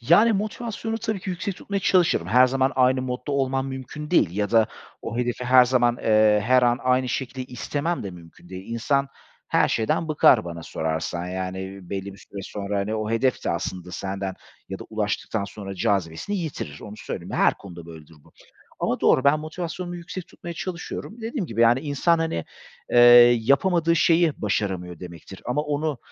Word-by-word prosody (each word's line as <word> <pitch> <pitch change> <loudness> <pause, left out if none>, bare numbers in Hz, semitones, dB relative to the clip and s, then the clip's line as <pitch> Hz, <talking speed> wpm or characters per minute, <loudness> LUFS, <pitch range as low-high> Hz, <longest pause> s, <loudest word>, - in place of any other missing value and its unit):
Yani, 175 - +5
motivasyonu 225 +2 -3
tabii 215 -3 -3
ki 185 - -5
yüksek 185 +2 -4
tutmaya 200 -1 -3
çalışırım. 180 -2 +2
Her 125 +1 +5
zaman 135 +1 +1
aynı 130 0 +3
modda 125 +2 -4
olmam 135 -1 0
mümkün 135 +4 -7
değil 100 - +4
ya 105 -1 -1
da 115 -2 +4 0.4
o 115 - -5
hedefi 125 0 -2
her 125 0 +7
zaman, 120 -1 +2
eee, 110 -1 +4
her 125 0 +5
an 120 0 +3
aynı 130 0 +2
şekilde 130 0 -3
istemem 145 +6 -3
de 100 - -5
mümkün 85 0 -15
değil. 95 +4 -8
İnsan 140 +4 0 0.4
her - - +3
şeyden 115 +8 0
bıkar 150 - +5
bana 85 -1 -7
sorarsan, 80 +2 -3
yani, 95 +1 -4
iii, 95 -1 -9
belli 100 0 -4
bir 100 - -15
süre 100 - -9
sonra, 100 +1 -4
hani, 105 +3 -2
o 110 0 -2
hedef 120 +3 0
de - - 0
aslında 90 +1 -4
senden 95 +1 -4 0.3
ya 95 - -5
da - - -9
ulaştıktan 105 -1 -2
sonra 100 -1 -8
cazibesini 95 - -1
yitirir, 140 - -5
onu 105 0 -9
söyleyeyim. - - -7
Her - - +3
konuda 85 -4 -11
böyledir 80 -1 -12
bu. - - -22 0.5
Ama - - -1
doğru, 130 - +4
ben 140 +2 +5
motivasyonumu 175 +2 -5
yüksek 175 +1 -7
tutmaya 170 0 -9
çalışıyorum. 185 +6 -6
Dediğim 225 - -3
gibi, 115 -2 -3
yani, 120 +3 +5
insan, 155 +3 +1
hani, 160 - -2 0.5
eee, - - +1 0.4
yapamadığı 165 +7 +2
şeyi 165 -3 +3
başaramıyor 95 -4 -2
demektir 90 +1 -10
ama 125 +4 0
onu 150 -2 -2
125 Hz, 180 wpm, -24 LUFS, 100-155 Hz, 0.5 s, her